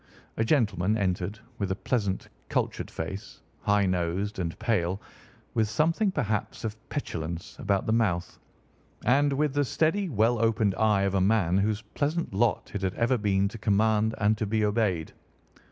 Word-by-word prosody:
A 110 - +2
gentleman 110 - +2
entered, 95 0 -1 0.2
with 100 -3 -1
a 95 - 0
pleasant, 100 -4 -1 0.2
cultured - - -1
face, 95 +6 -6 0.2
high 100 -1 +3
nosed 95 +3 -1
and 85 -2 -3
pale, 95 -4 0 0.5
with 110 -2 +1
something 165 - +2
perhaps 105 - -2
of 110 -1 -3
petulance 85 - -4
about 100 -1 0
the 110 - +1
mouth, 100 -7 0 0.7
and 140 +3 +4
with 145 0 +1
the 145 0 +2
steady, 165 +8 +1
well 115 -1 +2
opened 110 -3 +2
eye 105 -1 +2
of 100 -1 +1
a 95 - +2
man 95 -3 +3
whose 105 +2 0
pleasant 155 - -1
lot 115 +4 +1
it 100 - -3
had 95 -1 -1
ever 120 +2 +2
been 100 -1 +2
to 115 - -9
command 110 +1 +2
and 105 0 +2
to 110 - -1
be 110 +1 +1
obeyed. 105 -7 0
105 Hz, 165 wpm, -28 LUFS, 95-115 Hz, 0.7 s, and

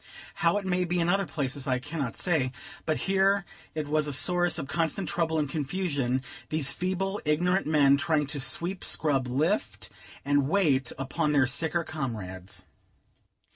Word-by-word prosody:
How 170 +2 +4
it 205 - -3
may 180 -1 +1
be 175 0 -1
in 170 - +1
other 195 0 +2
places 140 -1 -3
I 130 -1 +2
cannot 140 -1 -4
say; 155 -8 +1 0.4
but 155 - 0
here 195 +1 +3 0.3
it 155 -2 -2
was 150 0 +1
a 145 - -3
source 175 +3 +3
of 150 -4 -4
constant 165 +4 -1
trouble 160 -2 0
and 150 -1 +1
confusion, 140 -3 -1 0.3
these 150 -3 +2
feeble, 190 +4 -2
ignorant 175 +4 +1
men 140 -3 +5
trying 150 0 +1
to 140 +1 -3
sweep, 175 +8 -2
scrub, 135 -5 +1
lift, 130 - -1 0.3
and 145 -1 +2
wait 150 -9 +2
upon 135 +2 -1
their 140 -3 +5
sicker 160 +6 0
comrades. 95 - -6
155 Hz, 160 wpm, -28 LUFS, 135-175 Hz, 0.4 s, men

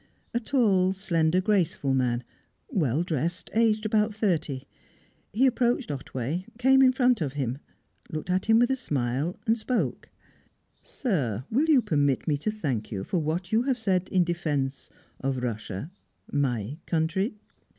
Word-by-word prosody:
A 235 - +1
tall, 205 -7 +2
slender, 175 -3 +1
graceful 180 -9 +1
man, 125 -2 +1 0.5
well 160 - +1
dressed, 170 +1 -2
aged 220 -1 +2
about 215 0 +2
thirty. 160 - -1 0.7
He 245 +6 +3
approached 245 - +1
Otway, 140 +5 -4
came 265 +2 +5
in 260 -1 +7
front 250 -4 +2
of 140 -4 -1
him, 135 -2 -2 0.5
looked 155 +3 -4
at 185 +2 0
him 225 0 +6
with 245 +2 +4
a - - +3
smile, 145 - -2
and 225 -1 +3
spoke. 240 +2 -2 0.7
"Sir, 130 - -2
will 285 +8 +2
you 275 -6 +5
permit 145 - +1
me 150 - +2
to 215 - -1
thank 140 - -3
you 95 -3 -3
for 180 - -1
what 165 +3 -2
you 220 +1 +4
have 260 0 0
said 190 -5 0
in 185 -2 +3
defence 150 -6 -2 0.3
of 135 0 -1
Russia 110 - -4 0.4
my 135 -1 -1
country?" 170 - 0
175 Hz, 150 wpm, -27 LUFS, 140-220 Hz, 0.7 s, in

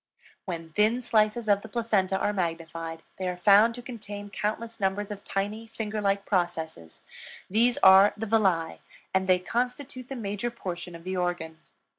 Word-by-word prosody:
When 165 -3 -6
thin 220 +6 +2
slices 215 +1 +2
of 200 -1 +4
the 220 - -9
placenta 205 -5 +1
are 205 - 0
magnified 165 -2 -4 0.2
they 185 - -2
are 180 - -4
found 205 +5 +6
to 245 - -9
contain 205 -4 -8
countless 220 +4 -3
numbers 195 +1 -1
of 205 -1 -7
tiny, 210 +3 -3
finger 220 -1 -4
like 200 0 +1
processes; 165 - -2 0.5
these 235 +4 +3
are 190 +2 +8
the 225 - -3
villi, 195 -7 +1 0.3
and 190 0 +1
they 185 -1 +5
constitute 250 +6 -3
the 270 - -4
major 210 0 -3
portion 180 -6 -6
of 165 - -11
the 185 +1 -3
organ. 175 -3 -2
200 Hz, 165 wpm, -27 LUFS, 180-225 Hz, 0.5 s, are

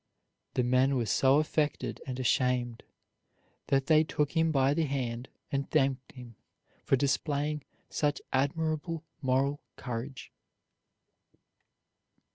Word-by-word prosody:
'" - - -53
The 125 - +2
men 130 +2 +3
were 120 -3 +1
so 135 +6 +4
affected 155 0 0
and 130 -1 -4
ashamed 125 -2 +1 0.9
that 135 -1 +2
they 155 +1 +5
took 150 -2 -1
him 165 -1 +2
by 135 -1 +3
the 160 +1 +1
hand 125 -3 -3 0.2
and 140 0 -1
thanked 135 -4 +1
him 120 -4 -11 0.5
for - - +3
displaying 145 +2 0 0.2
such 145 -1 0
admirable 155 +3 0 0.2
moral 135 +2 +1
courage. 125 +2 -6
135 Hz, 115 wpm, -30 LUFS, 130-150 Hz, 0.9 s, they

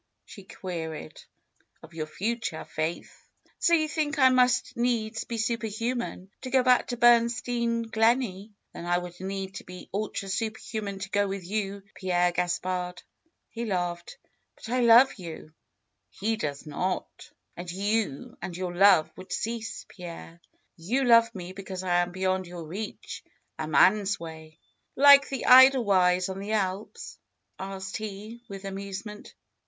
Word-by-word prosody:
she 200 - -12
queried. 160 - -7 0.6
^^Of 160 +1 -14
your 155 -1 -4
future. 220 0 -3
Faith." 160 +2 -4 0.5
^^So 340 -1 +4
you 310 - 0
think 310 0 -2
I 260 -2 +6
must 250 -1 +2
needs 230 -2 -1
be 235 - -4
super 225 0 -1
human 225 -3 -4
to 260 - -6
go 260 0 +3
back 250 -1 +4
to 245 - -4
Bernstein 235 0 +3
Gleney! 225 -3 +1 0.2
Then 170 - -8
I 175 0 +2
would 180 0 -7
need 190 0 -4
to - - -9
be 180 0 -11
ultra 200 -1 -3
super 220 +3 -2
human 205 -3 -5
to 195 0 -6
go 205 0 +2
with 195 -2 -5
you, 200 0 -3
Pierre 180 -2 +1
Gaspard 180 +1 -2 0.2
!" 330 - -49
He 235 - -5
laughed. 175 -5 -3 0.4
^^But 225 - -6
I 255 - +2
love 240 +2 +7
you; 160 -3 -9 0.6
he 225 +3 -2
does 145 -9 -4
not." 180 +5 -4 0.3
^^And 180 -2 -3
your 180 -1 -3
love 190 -4 +5
would 185 +1 -11
cease, 225 0 -4
Pierre. 170 -1 -10 0.4
You 225 +12 0
love 230 -2 +5
me 180 -1 -7
because 190 -1 -7
I 175 -1 +2
am 175 0 -2
beyond 185 0 -1
your 175 -1 -8
reach. 200 +7 -7 0.4
A 155 - -3
man's 200 +5 +4
way 160 -1 -10 0.2
!" - - -45
^^Like 280 0 +8
the 270 -3 -4
Edelweiss 205 -9 +6
on 190 0 -5
the 205 +2 -4
Alps?" 195 -1 -3 0.4
asked 190 +1 -5
he 215 +2 -7
with 195 0 -8
amusement. 200 +2 -7
195 Hz, 150 wpm, -27 LUFS, 180-230 Hz, 0.6 s, ^^Like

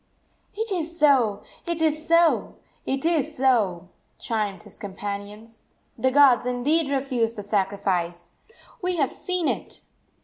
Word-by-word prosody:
"It 445 +1 -1
is 340 -2 -3
so, 255 - +3 0.2
it 340 -1 -1
is 310 0 0
so, 335 0 +3 0.3
it 270 +3 -1
is 315 -2 0
so!" 210 -10 +1 0.3
chimed 210 -5 -3
his - - -15
companions. 205 +3 -7 0.3
"The 260 - +1
gods 260 -3 +5
indeed 280 +5 +1
refuse 260 -5 0
the 205 - -7
sacrifice! 190 -4 -1 0.5
We 365 -1 -1
have 285 -5 +1
seen 365 -3 -1
it!" - - -4
255 Hz, 130 wpm, -24 LUFS, 205-315 Hz, 0.5 s, gods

